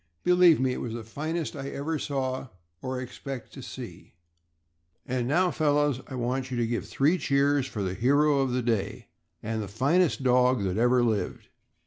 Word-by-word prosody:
Believe 180 -2 +6
me, 130 -1 +1
it - - -5
was 115 -2 -4
the 115 - -6
finest 155 +9 -4
I 140 -1 -5
ever 150 +3 -3
saw 130 -2 -2 0.3
or 130 0 -3
expect 130 0 -7
to - - -9
see. - - -9 0.9
And 125 -1 -1
now, 175 +6 +2
fellows, 145 -4 +1
I 130 - -7
want 125 +1 -2
you 125 - -3
to 120 - +1
give 115 0 -3
three 155 +7 +2
cheers 140 -1 +2
for 105 -5 -4
the 95 -1 -2
hero 140 +6 +3
of 135 -1 +1
the 125 0 -1
day 115 -4 -2 0.3
and 110 0 -2
the 105 - -4
finest 140 - +1
dog 125 -2 +3
that 95 0 -1
ever 125 +1 +4
lived. 110 -4 -2
130 Hz, 180 wpm, -27 LUFS, 120-145 Hz, 0.9 s, Believe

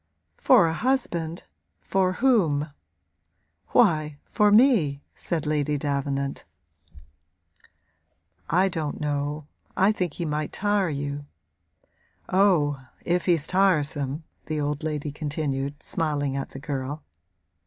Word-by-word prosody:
'For 170 - +5
a 160 - 0
husband 170 -8 -1 0.4
for 185 -1 +1
whom?' 170 - +2 1.0
'Why 155 -9 +3
for 210 -2 +4
me,' 205 - +4
said 165 -4 -3
Lady 150 -1 0
Davenant. 140 -1 -2 2.1
'I 185 +4 +3
don't 160 -4 -3
know 145 0 -2 0.3
I 195 +3 +5
think 180 -7 -2
he 170 - -4
might 150 0 -2
tire 205 -3 +1
you.' 145 0 -4 1.0
'Oh 160 -8 +3 0.2
if 175 +1 0
he's 165 -4 +3
tiresome!' 150 -6 +1 0.2
the 155 -1 -2
old 145 0 -2
lady 150 -2 -3
continued, 145 -2 -3
smiling 145 -4 -1
at 135 - -3
the 135 - -9
girl. 140 0 -4
150 Hz, 110 wpm, -25 LUFS, 145-180 Hz, 2.1 s, For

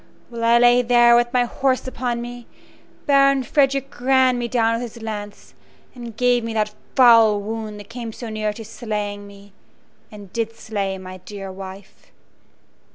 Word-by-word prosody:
While 235 -1 -6
I 235 +1 +5
lay 245 +1 +5
there 240 0 +5
with 240 0 +2
my 250 -1 +2
horse 260 +2 -1
upon 245 -2 -3
me, 240 0 -9 0.6
Baron 275 -1 +4
Frederick 275 -1 0
ran 260 -1 +3
me 240 - -2
down 230 -2 +1
with 230 - -2
his 230 - -11
lance, 210 -2 -7 0.4
and 235 -3 -10
gave 245 -1 +2
me 225 0 -4
that 210 -1 0 0.2
foul 230 -4 +6
wound 215 0 -6
that 205 0 -12
came 230 -1 -6
so 235 +2 -8
near 215 -1 -2
to 220 +1 -9
slaying 210 -2 -5
me 200 0 -16 0.6
and 205 -3 -12
did 230 -1 -3
slay 200 -4 -4
my 185 0 -9
dear 195 +1 -9
wife. 190 +1 -11
230 Hz, 165 wpm, -21 LUFS, 210-245 Hz, 0.6 s, foul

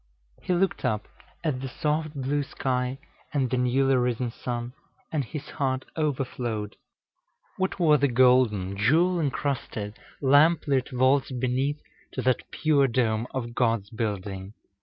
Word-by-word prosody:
He - - -3
looked 190 +2 +1
up 105 -1 -1 0.4
at 145 -6 -1
the 135 - -3
soft 155 +2 -1
blue 140 +2 0
sky 130 -1 -2 0.3
and 135 -4 0
the 130 - +1
newly 130 +2 +3
risen 125 -1 0
sun, 120 +1 -4 0.4
and 150 -3 0
his 150 +4 -7
heart 130 -2 -1
overflowed. 125 -8 -2 0.8
What 190 +1 -1
were 155 -4 +5
the 140 0 +3
golden, 120 -6 +3
jewel 165 - +3
incrusted, 130 -7 -2 0.2
lamp 145 +5 +5
lit 135 -3 +1
vaults 130 +2 +2
beneath 130 +3 0 0.3
to 130 - -3
that 130 -1 +1
pure 145 -3 +3
dome 115 -2 0
of 120 -3 -4
God's 115 -5 0
building! 100 -3 -4
130 Hz, 140 wpm, -26 LUFS, 120-145 Hz, 0.8 s, were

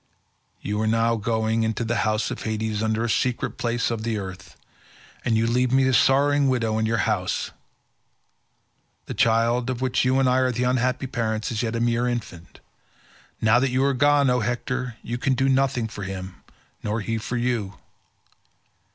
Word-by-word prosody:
You 105 +1 -2
are 110 - 0
now 115 +1 +2
going 110 0 0
into 110 +1 -1
the 115 +1 -1
house 110 0 0
of - - -5
Hades 110 -1 -2
under 110 +1 0
the - - 0
secret 125 +2 -1
places 120 0 0
of 115 -2 -3
the 110 -1 -2
earth, 95 -5 -8 0.7
and 115 -3 +1
you 110 - +2
leave 125 +2 +1
me 135 0 +4
a 130 - +2
sorrowing 140 +2 +4
widow 115 -4 0
in 110 - +1
your 115 -1 +1
house. 100 -5 -1 1.5
The - - -5
child, 115 +2 +2
of 125 -2 -2
whom 130 -1 -1
you 130 +1 +2
and 135 - +3
I 125 +1 +3
are 130 -1 +2
the 120 +1 -2
unhappy 125 +1 0
parents, 110 -4 -2
is 110 - -2
as - - +1
yet 115 -1 -2
a - - -1
mere 120 +1 +1
infant. 105 -8 -6 0.8
Now 110 +2 +4
that 135 +1 +1
you 130 +2 +1
are 140 - +2
gone, 145 +2 +3
O 125 - +2
Hector, 120 +1 -2
you 120 +1 -4
can 130 +1 +1
do 135 +1 +1
nothing 130 -3 +1
for 105 - -9
him 95 -1 -7 0.4
nor 105 +2 -2
he 115 +2 -2
for 120 +3 -3
you. 120 -5 -1
115 Hz, 190 wpm, -24 LUFS, 110-125 Hz, 1.5 s, me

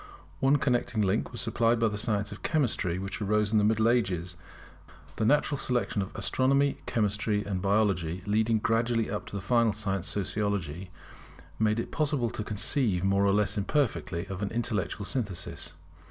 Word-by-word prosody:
One 135 +2 +4
connecting 120 -5 +1
link 100 +3 0
was 120 - -4
supplied 115 -1 +1
by 115 - +3
the 105 - -2
science 105 -1 -1
of - - -9
Chemistry 115 - 0
which 100 +3 -5
arose 105 +1 +1
in 110 - +4
the - - +2
Middle 110 +1 +3
Ages. 90 -7 0 0.8
The 110 - 0
natural 145 0 +2
succession 120 -5 0
of 95 - -4
Astronomy, 135 +8 +2
Chemistry, 105 -1 0
and 95 -3 -2
Biology 95 -4 +1
leading 110 +2 +2
gradually 115 +1 +1
up 105 - -4
to - - -7
the 100 - -4
final 115 +1 +3
science, 100 -3 -2
Sociology, 95 -4 -2 0.7
made 110 0 +2
it - - -4
possible 145 -7 0
to 110 - -4
conceive 105 -2 0
more 100 +1 +2
or - - +4
less 105 0 +1
imperfectly 100 - -1
of 95 0 -6
an 100 - -1
intellectual 105 -4 -2
synthesis. 105 -7 -4
105 Hz, 170 wpm, -28 LUFS, 100-115 Hz, 0.8 s, One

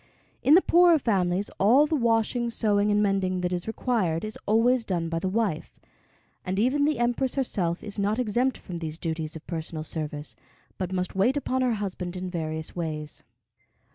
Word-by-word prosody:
In 290 - +6
the 370 - +6
poorer 345 -1 +6
families 195 -6 0
all 245 +9 +6
the 310 - 0
washing, 235 -1 +1
sewing, 210 -3 +1
and 210 0 +3
mending 190 -2 0
that 180 0 -1
is 175 +2 -3
required 215 -7 -1
is 215 - -5
always 230 +3 +3
done 175 -5 -2
by 165 0 -1
the 185 - -1
wife; 195 -6 -2 0.6
and 185 0 -3
even 260 +7 +2
the 300 -1 +1
Empress 240 +2 0
herself 185 -10 -1
is 210 -1 -6
not 205 +2 +1
exempt 250 +2 0
from 180 -3 -7
these 160 -2 -5
duties 160 -2 -3
of 160 - -9
personal 160 -2 -5
service, 150 -5 -5 0.4
but 185 -1 -3
must 185 -1 -2
wait 225 +9 +2
upon 260 -2 -1
her 250 -2 +2
husband 185 -3 -4
in 180 0 -5
various 160 -2 -4
ways. 155 -3 -4
200 Hz, 180 wpm, -26 LUFS, 170-240 Hz, 0.6 s, In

